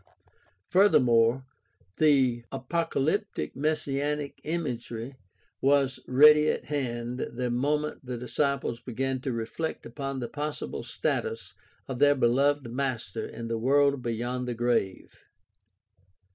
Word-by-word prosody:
Furthermore, 125 Hz, -, +4 dB, 0.5 s
the 130 Hz, -6 st, +3 dB
apocal>'ptic 160 Hz, +6 st, -1 dB
messianic 145 Hz, 0 st, -2 dB
imagery 130 Hz, -6 st, -4 dB, 0.5 s
was 135 Hz, -1 st, +2 dB
ready 150 Hz, +3 st, +7 dB
at -, -, -1 dB
hand 125 Hz, -4 st, -3 dB
the 125 Hz, 0 st, -3 dB
moment 150 Hz, +5 st, -1 dB
the 125 Hz, -1 st, -5 dB
disciples 130 Hz, -1 st, -1 dB
began 130 Hz, +2 st, -3 dB
to 135 Hz, -1 st, -2 dB
reflect 115 Hz, +8 st, -4 dB
upon 135 Hz, +3 st, -5 dB
the 120 Hz, -, -3 dB
possible 145 Hz, +4 st, -4 dB
status 460 Hz, -1 st, -3 dB, 0.3 s
of 130 Hz, -3 st, -5 dB
their 145 Hz, 0 st, +5 dB
beloved 135 Hz, +1 st, +2 dB
master 125 Hz, -6 st, -3 dB
in 115 Hz, -, -7 dB
the 115 Hz, 0 st, -2 dB
world 140 Hz, +2 st, +3 dB
beyond 120 Hz, +2 st, -3 dB
the 120 Hz, -, -2 dB
grave. 115 Hz, -5 st, -1 dB
135 Hz, 110 wpm, -28 LUFS, 120-145 Hz, 0.5 s, ready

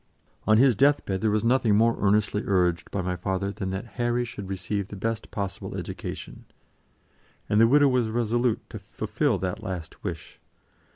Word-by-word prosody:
On 110 Hz, 0 st, +6 dB
his 130 Hz, 0 st, +5 dB
death 140 Hz, +6 st, +3 dB
bed 95 Hz, -1 st, -2 dB
there 110 Hz, -, +2 dB
was 105 Hz, +1 st, +1 dB
nothing 115 Hz, -3 st, +3 dB
more 115 Hz, +2 st, +4 dB
earnestly 105 Hz, 0 st, +2 dB
urged 90 Hz, -3 st, +1 dB
by 95 Hz, -, -2 dB
my 90 Hz, 0 st, -1 dB
father 95 Hz, +2 st, -2 dB
than 95 Hz, -1 st, -4 dB
that 95 Hz, +3 st, -4 dB, 0.2 s
Harry 120 Hz, 0 st, +1 dB
should 100 Hz, -5 st, -8 dB
receive 95 Hz, +1 st, -3 dB
the 100 Hz, -, -8 dB
best 115 Hz, +3 st, -3 dB
possible 100 Hz, -3 st, -4 dB
education, -, -, -7 dB, 1.0 s
and 105 Hz, +2 st, +3 dB
the 115 Hz, -, +7 dB
widow 145 Hz, +3 st, +5 dB
was 125 Hz, -3 st, +2 dB
resolute 120 Hz, +1 st, 0 dB
to 110 Hz, -, -6 dB
fulfil 110 Hz, +5 st, -1 dB
that 90 Hz, 0 st, -3 dB
last 90 Hz, -3 st, -6 dB
wish. -, -, -6 dB
105 Hz, 175 wpm, -26 LUFS, 95-120 Hz, 1.0 s, the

